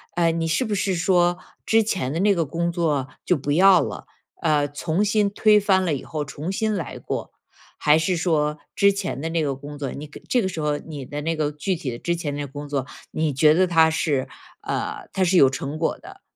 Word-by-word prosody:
嗯， 165 -1 +2
你 165 - -1
是 165 +11 +1
不 215 - -2
是 190 -1 0
说， 175 0 +2 0.3
之 225 0 +4
前 185 -11 -2
的 165 - -2
那 205 0 +4
个 165 - 0
工 170 +4 -2
作 150 -6 0 0.2
就 180 - +3
不 140 +1 -3
要 185 +2 +6
了， - - -5 0.4
呃， 150 -3 +2
从 160 +6 -1
新 205 -1 +2
推 210 +1 +4
翻 195 -2 +2
了 160 - +1
以 135 - -4
后 155 -2 -3
重 150 +5 -6
新 215 +2 0
来 180 - -4
过？ - - -5 0.5
还 150 +1 +4
是 180 +3 0
说 155 -3 +1 0.2
之 200 0 +5
前 195 -7 -3
的 160 - -2
那 165 -1 0
个 140 - 0
工 145 +2 -9
作” 140 -2 -4
你 150 +2 -7
这 240 - -2
个 190 - -1
时 165 -3 -5
候 150 -1 0
你 145 -3 -8
的 145 - -5
那 165 +2 -1
个 150 -1 -1
具 165 +6 -2
体 155 -6 -4
的 120 - -7
之 170 - -1
前 160 -4 -4
的 145 - -4
那 - - -3
工 145 +2 -8
作， 140 -3 -1 0.3
你 155 -2 -1
觉 150 +3 +5
得 185 +3 +3
它 165 -2 +5
是， 145 -5 0 0.3
呃， 420 -4 -4
它 190 - +1
是 180 0 +3
有 135 - +7
成 140 +3 -4
果 160 - -1
的， - - -13
165 Hz, 255 characters per minute, -23 LUFS, 145-185 Hz, 0.5 s, 有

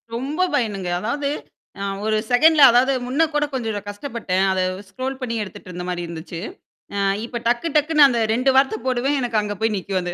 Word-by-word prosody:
ரொம்ப 290 +9 -1
பயனுங்க. 200 -8 -1
அதாவது, 280 +6 -2 0.5
ஆ, - - -2 0.2
ஒரு 215 0 +1
செகண்ட்ல 305 +4 +6
அதாவது 255 +3 +4
முன்ன 280 +6 +2
கூட 295 0 +2
கொஞ்சம் 225 -5 -2
கஷ்டப்பட்டேன். 205 -4 -2
அத 190 - 0 0.3
ஸ்க்ரோல் 260 +6 -5
பண்ணி 230 -2 -3
எடுத்துட்டு 190 -2 -11
இருந்த 180 0 -6
மாரி 175 -1 -3
இருந்துச்சு. 165 +1 -7 0.5
ஆ, - - -2 0.3
இப்ப 240 0 -6
டக்கு 240 +8 +1
டக்குன்னு 300 -1 +5
அந்த 235 -2 0
2 255 +3 +2
வார்த்த 265 -5 +2
போடுவேன். 260 +3 +1
எனக்கு 235 -3 0
அங்க 205 0 -4
போய் 220 -1 +1
நிக்கும் 190 0 -2
அது. 175 0 -4
235 Hz, 185 wpm, -21 LUFS, 200-275 Hz, 0.5 s, செகண்ட்ல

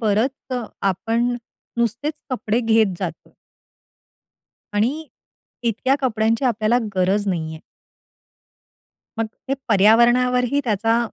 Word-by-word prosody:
बरंच 230 +5 0 0.4
आपण 235 +5 -1 0.4
नुसतेच 240 +6 -1 0.2
कपडे 235 -2 0
घेत 220 -4 +3
जातो. - - -6 1.4
आणि 260 +10 0 0.6
इतक्या 235 +3 +1
कपड्यांची 225 -1 +1
आपल्याला 235 -1 +2 0.2
गरज 195 +3 +2
नाहीये. 160 -3 -3 1.6
मग 225 - +1 0.2
हे 270 - +2
पर्यावरणावरही 240 +5 +4
त्याचा, 225 +1 +2
230 Hz, 85 wpm, -21 LUFS, 210-250 Hz, 1.6 s, पर्यावरणावरही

